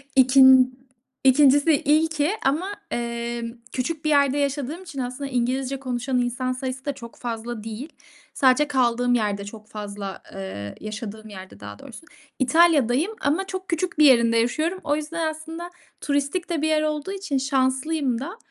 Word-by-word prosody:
ikin 260 -1 +6 0.4
ikincisi 285 +3 +5
ilki, 310 +2 +2
ki 295 +3 +2 0.2
ama, 315 +8 +1 0.2
emm, 235 0 -3 0.2
küçük 305 +5 -3
bir - - +2
yerde 280 -1 +3
yaşadığım 285 +4 -2
için, 340 -7 -8
aslında 255 +2 -4
İngilizce 260 +2 -1
konuşan 250 0 -2
insan 245 +1 -1
sayısı 260 +1 -5
da 285 - -1
çok 235 -4 -11
fazla 230 -2 -5
değil. 225 +7 -6 0.4
Sadece 265 +2 +3
kaldığım 245 -3 +1
yerde 205 -4 0
çok 215 +1 -11
fazla, 205 -2 -7
eee, 145 - -6
yaşadığım 215 0 -7
yerde 190 -2 -11
daha 105 0 -9
doğrusu. 325 - -12 0.3
İtalya'dayım 290 - +3
ama 335 +7 0
çok 375 0 -6
küçük 335 -1 -2
bir 305 - +7
yerinde 235 -4 +5
yaşıyorum. 310 +11 0
O 290 - +1
yüzden, 315 +2 -3
aslında 325 +2 -8 0.3
turistik 285 +5 -1
de 335 -4 -1
bir 315 - +1
yer 310 -1 +2
olduğu 305 +3 -2
için 390 -8 -2
şanslıyım 265 0 0
da, 345 - -6
265 Hz, 155 wpm, -24 LUFS, 235-305 Hz, 0.4 s, bir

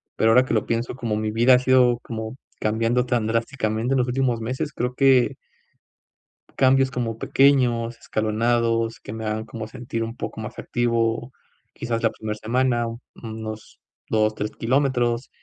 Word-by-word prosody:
Pero 110 - +3
ahora 125 +3 +5
que - - -2
lo 110 - +1
pienso 115 +1 -2
como 115 -4 -2
mi 110 0 -1
vida 120 +4 +5
ha - - +3
sido 125 -1 +4
como 110 0 -5 0.2
cambiando 115 +3 +1
tan 120 -3 0
drásticamente 115 +1 -1
en - - +2
los 125 - +1
últimos 125 -2 0
meses, 130 +6 -3
creo 125 0 -2
que 135 -2 +4 1.2
cambios 135 0 +4
como 115 -3 -3
pequeños, 120 -3 +2
escalonados, 115 +1 0
que - - -8
me 110 0 -5
hagan 110 0 -2
como 115 -1 -7
sentir 120 -1 -4
un 115 +1 -5
poco 110 - -6
más 110 +2 -7
activo. 115 0 0 0.4
Quizás, 115 -1 -3
la 115 - +4
primera 110 -1 -5
semana, 120 +2 +1 0.4
unos 110 -1 -7 0.3
2, 110 -1 +2
3 105 +1 -3
kilómetros, 125 -1 0
115 Hz, 160 wpm, -23 LUFS, 110-125 Hz, 1.2 s, ahora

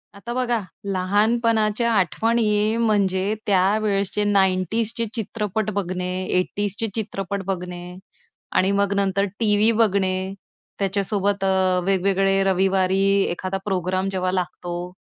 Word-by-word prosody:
आता 235 +4 -6
बघा 245 -2 0 0.3
लहानपणाच्या 220 +3 +2
आठवणी 215 +2 +1
म्हणजे 200 -3 +1
त्यावेळेसचे 200 +1 +1
90ज 200 +2 +1
चे 230 - 0
चित्रपट 215 -1 -2
बघणे. 180 -2 -3
80ज 195 +2 -1
चे 225 - 0
चित्रपट 200 -3 -3
बघणे 180 -1 -5 0.6
आणि 190 +1 +3
मग 200 0 +1
नंतर 195 0 +1
टीव्ही 215 0 +3
बघणे. 190 -2 +1 0.5
त्याच्यासोबत 200 0 0
अ, 190 -1 +2
वेगवेगळे 195 0 +2
रविवारी 190 0 +2 0.3
एखादा 185 +2 -3
प्रोग्राम 185 -1 -1
जेव्हा 185 -1 -1
लागतो. 175 -1 -4
195 Hz, 110 wpm, -22 LUFS, 185-210 Hz, 0.6 s, आणि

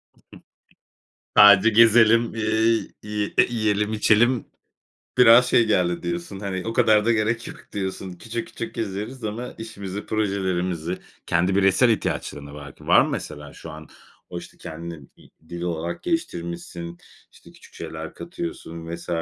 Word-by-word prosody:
Hı - - -28
hı. - - -28 1.2
Sadece 100 +1 +8
gezelim, 115 +1 +5
eee, 110 +1 +1 0.2
yi 105 -1 -3 0.2
yiyelim 105 -2 0
içelim. 110 +2 +3 0.7
Biraz 125 0 +8
şey 120 -1 +4
geldi 90 -5 +1
diyorsun 85 +3 -4
hani, 95 -2 -4
o 115 - -2
kadar 110 -2 +4
da 120 - +3
gerek 115 +1 0
yok - - -9 0.2
diyorsun. 95 -1 -4
Küçük, 115 +7 -6
küçük 115 - -7
gezeriz 110 +4 -5
ama 115 +4 -5
işimizi, 100 -3 -7
projelerimizi 95 -5 -1 0.3
kendi 90 +3 +1
bireysel 100 +5 +4
ihtiyaçların 75 -8 -2
da 70 - -11
var 70 -2 -10
ki, - - -17
var - - +6
mı - - -2
mesela 75 -1 -6
şu 80 - -10
an? 80 0 -11 0.4
O, 90 - -5
işte, 85 0 -12
kendini 80 -3 -8
i - - -20 0.2
dil 85 0 -6
olarak 85 -1 -3
geliştirmişsin, 85 - -4 0.3
işte - - -18
küçük - - -18
şeyler 80 0 -7
katıyorsun 85 - -7
vs. 85 - -13
100 Hz, 150 wpm, -23 LUFS, 85-115 Hz, 1.2 s, Sadece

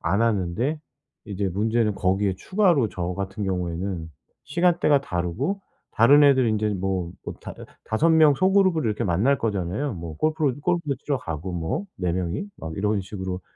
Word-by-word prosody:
안 100 +6 +1
하는데 115 - 0 0.5
이제 100 -2 -2
문제는 110 +3 +1
거기에 95 +1 +1
추가로 175 - +2
저 90 0 -3
같은 100 +2 -4
경우에는 90 -2 -3 0.3
시간대가 170 -2 +2
다르고 105 - -2 0.3
다른 140 +6 +6
애들 130 -3 +5
인제 110 0 +1
뭐 95 -3 -2
뭐 - - -5
다 - - -8 0.3
5 155 +10 +2
명 155 -3 +6
소그룹으로 185 -3 +3
이렇게 105 -1 -1
만날 105 +11 +2
거잖아요. 105 +5 -2
뭐 85 -3 -7
골프를 155 -3 0
골프도 170 -4 0
치러 140 +1 -2
가고 85 +1 -5
뭐 90 - -3
4 90 -2 -1
명이 90 - -2
막 80 0 -6
이런 105 0 0
식으로. 95 -1 -5
105 Hz, 325 characters per minute, -24 LUFS, 90-145 Hz, 0.5 s, 다른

